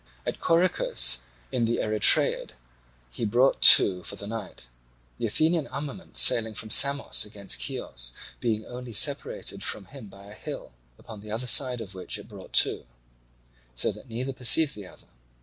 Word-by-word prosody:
At - - -5
Corycus 165 - +1 0.3
in 120 - -1
the 115 +1 -2
Erythraeid 110 0 +3 0.6
he 90 - -7
brought 120 +5 +1 0.2
to 90 -2 -2
for - - -3
the 100 - -7
night; 105 - -8 0.5
the 115 - -2
Athenian 155 +7 0
armament 150 +7 -8
sailing 110 -2 +5
from 110 +1 -6
Samos 140 +3 +4
against 100 - -4
Chios - - -3 0.3
being 110 -2 -3
only 125 -1 -10
separated 140 +6 0
from 95 - -3
him 125 +1 -13
by 100 0 -16
a 100 - -13
hill, - - -9 0.3
upon 110 -2 -12
the 105 - -13
other 115 +4 -4
side 125 -1 +3
of 100 -3 -9
which 95 -1 -5
it - - -13
brought - - -14
to; - - -7 0.9
so - - 0
that 125 - -14
neither 125 +4 -5
perceived 135 +4 +3
the 100 -3 -10
other. - - -17
115 Hz, 165 wpm, -25 LUFS, 100-135 Hz, 0.9 s, sailing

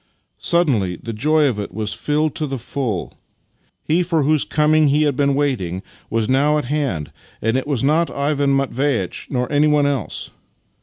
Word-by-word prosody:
Suddenly 130 - +1
the 115 +6 -7
joy 150 +7 +2
of 120 -7 0
it 105 - -5
was 105 +2 -3
filled 150 +3 0
to 155 - -3
the 135 -1 -3
full! 120 -5 -4 0.6
He 165 +3 +2
for 165 -4 +1
whose 150 +1 +2
coming 155 0 +3
he 145 +2 +3
had 145 -3 +1
been 140 0 +2
waiting, 100 -11 -1 0.3
was 115 -1 0
now 145 +3 +3
at 150 - -2
hand 120 - -2 0.3
and 115 +2 0
it 130 +2 -1
was 140 -4 -1
not 160 +4 +2
Ivan 140 -1 0
Mat 135 -1 0
veitch 125 -9 -1
nor 125 -1 0
anyone 150 0 +3
else. 140 -6 -2
140 Hz, 175 wpm, -20 LUFS, 115-150 Hz, 0.6 s, coming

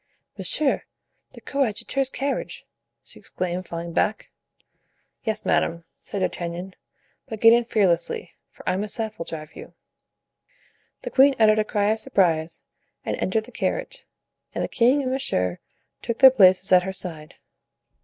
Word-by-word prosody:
"Monsieur 300 -3 0 0.5
the - - -13
coadjutor's 270 +1 -1
carriage!" 275 +1 -4 0.4
she - - -12
exclaimed, 180 0 -4
falling 170 0 -6
back. 210 +5 -1 0.9
"Yes, 215 -1 -2
madame," 170 0 +1 0.2
said 200 - -5
D'Artagnan; 175 +1 -4 0.5
"but 220 -4 -6
get 225 +1 +7
in 235 0 +3
fearlessly, 180 -6 0 0.2
for - - -16
I 185 - +1
myself 215 +2 -3
will 165 - -4
drive 155 -1 -8
you." - - -11 1.3
The - - -5
queen 275 +1 +5
uttered 215 -1 +5
a - - +3
cry 205 -1 0
of 220 - -1
surprise 165 -6 0 0.4
and - - -1
entered 220 +4 0
the - - -14
carriage, - - -3 0.5
and - - -1
the - - -1
king 260 +4 +2
and 255 - -2
monsieur 90 - -1 0.4
took 235 - -3
their 265 - +9
places 185 -5 +4
at 180 -1 +7
her 190 +1 -5
side. 165 -5 -6
205 Hz, 145 wpm, -24 LUFS, 175-235 Hz, 1.3 s, their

